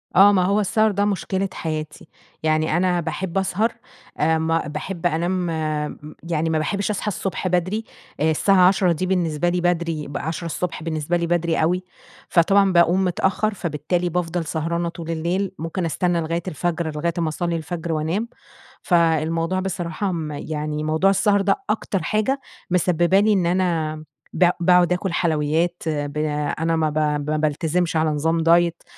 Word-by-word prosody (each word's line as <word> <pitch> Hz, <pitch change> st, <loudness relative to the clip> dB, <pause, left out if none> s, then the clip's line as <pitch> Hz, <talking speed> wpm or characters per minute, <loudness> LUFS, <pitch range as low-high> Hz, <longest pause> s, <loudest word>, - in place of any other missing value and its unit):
آه، 200 Hz, +2 st, +8 dB
ما 190 Hz, -2 st, +3 dB
هو 200 Hz, +3 st, +2 dB
السهر 215 Hz, +2 st, +2 dB
ده 200 Hz, +1 st, +1 dB
مشكلة 195 Hz, -1 st, -1 dB
حياتي. 155 Hz, -2 st, -5 dB, 0.4 s
يعني 155 Hz, +1 st, +1 dB
أنا 180 Hz, -1 st, +2 dB
باحب 175 Hz, +2 st, -3 dB
أسهر، 195 Hz, +4 st, 0 dB, 0.5 s
آآ 160 Hz, +1 st, +3 dB
ما 165 Hz, 0 st, 0 dB
باحب 165 Hz, +4 st, -5 dB
أنام 170 Hz, +1 st, +1 dB, 0.6 s
م 150 Hz, +1 st, -11 dB
يعني 165 Hz, -1 st, -1 dB
ما 160 Hz, -, +1 dB
باحبش 200 Hz, +6 st, -1 dB
أصحى 210 Hz, +1 st, -4 dB
الصبح 195 Hz, -2 st, -2 dB
بدري، 185 Hz, +5 st, 0 dB, 0.4 s
آآ، 160 Hz, +1 st, +3 dB
الساعة 185 Hz, +3 st, +4 dB
10:00 185 Hz, -1 st, +3 dB
دي 170 Hz, +2 st, -1 dB
بالنسبة 175 Hz, -3 st, 0 dB
لي 180 Hz, 0 st, 0 dB
بدري 170 Hz, -3 st, -1 dB
ب 140 Hz, -, -5 dB
10:00 160 Hz, +2 st, -4 dB
الصبح 165 Hz, 0 st, -3 dB
بالنسبة 160 Hz, +1 st, -1 dB
لي، 170 Hz, 0 st, -1 dB
بدري 170 Hz, -1 st, +1 dB
أوي. 180 Hz, +3 st, +1 dB, 0.5 s
فطبعًا 195 Hz, +3 st, +4 dB
باقوم 175 Hz, +2 st, +4 dB
متأخر، 190 Hz, +4 st, 0 dB
فبالتالي 175 Hz, 0 st, -2 dB
بافضل 175 Hz, 0 st, -2 dB
سهرانة 170 Hz, +2 st, -2 dB
طول 165 Hz, -1 st, -6 dB
الليل، 175 Hz, +4 st, -1 dB
ممكن 165 Hz, +3 st, -3 dB
أستنى 170 Hz, +2 st, 0 dB
لغاية 165 Hz, +1 st, -2 dB
الفجر 170 Hz, -1 st, -2 dB
لغاية 170 Hz, +3 st, -1 dB
أما 165 Hz, -2 st, 0 dB
أصلّي 170 Hz, +2 st, -2 dB
الفجر 165 Hz, +1 st, -4 dB
وأنام. 165 Hz, +9 st, -1 dB, 0.5 s
فالموضوع 165 Hz, +1 st, +1 dB
بصراحة 185 Hz, 0 st, -3 dB
م 160 Hz, -3 st, -3 dB
يعني 150 Hz, +1 st, -4 dB
موضوع 155 Hz, +5 st, +2 dB
السهر 200 Hz, +1 st, +3 dB
ده 195 Hz, 0 st, +2 dB
أكتر 205 Hz, -4 st, -1 dB
حاجة 215 Hz, -, 0 dB, 0.3 s
مسببة 180 Hz, +1 st, +3 dB
لي 215 Hz, +1 st, +3 dB
إن 190 Hz, -4 st, +1 dB
أنا 170 Hz, -3 st, 0 dB, 0.4 s
ب 180 Hz, -1 st, +4 dB
باقعد 180 Hz, 0 st, +4 dB
أكل 180 Hz, 0 st, -2 dB
حلويات، 165 Hz, +1 st, 0 dB
ب 145 Hz, -1 st, -2 dB, 0.4 s
أنا 165 Hz, +1 st, +1 dB
ما 160 Hz, -1 st, +1 dB
ب 150 Hz, -, -4 dB, 0.3 s
ما 155 Hz, -, +1 dB
بالتزمش 160 Hz, +3 st, 0 dB
على 160 Hz, 0 st, +2 dB
نظام 160 Hz, +2 st, 0 dB
دايت 170 Hz, +1 st, +3 dB
170 Hz, 165 wpm, -22 LUFS, 160-185 Hz, 0.6 s, آه